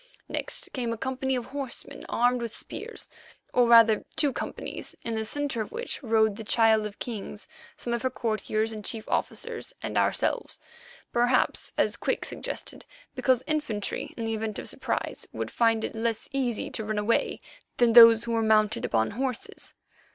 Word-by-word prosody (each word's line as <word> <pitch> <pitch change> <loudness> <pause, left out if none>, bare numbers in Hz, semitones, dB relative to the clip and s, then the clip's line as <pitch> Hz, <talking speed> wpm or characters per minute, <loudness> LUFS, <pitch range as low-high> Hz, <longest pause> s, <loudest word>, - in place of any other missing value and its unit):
Next - - -1
came 240 -3 -2
a 230 - -3
company 265 +2 -1
of 245 -2 -3
horsemen 270 -2 -6
armed 245 +1 +2
with 230 -2 -5
spears, - - -7 0.5
or 245 -1 +4
rather 230 -2 +7
two 295 -4 +2
companies - - -5
in 230 - -3
the 220 0 -1
centre 275 +1 -1
of 215 - -5
which 475 +1 -2
rode 220 -4 +2
the 225 - -6
Child 220 -1 +3
of 205 - -12
Kings, 215 -3 -6 0.3
some 240 - -3
of 235 - -1
her 260 - +1
courtiers 220 -2 -1
and 215 -1 -7
chief 220 +2 -4
officers, - - -2
and - - 0
ourselves, - - 0 0.6
perhaps, 245 +1 +2
as - - +2
Quick - - -1
suggested, - - -6 0.3
because 255 -1 +2
infantry 295 -10 -2
in 230 - -3
the 225 - -1
event 220 -1 -3
of - - -5
surprise - - -3
would - - -4
find 225 -1 +2
it - - -3
less 225 -1 -2
easy 255 -5 -1
to 220 - -2
run 215 0 -2
away 210 +3 +1 0.4
than 240 -2 +4
those 230 -1 +10
who 235 - -4
were 230 -1 +2
mounted 220 +1 +3
upon 110 -1 +1
horses. 255 +2 -4
230 Hz, 175 wpm, -27 LUFS, 220-250 Hz, 0.6 s, those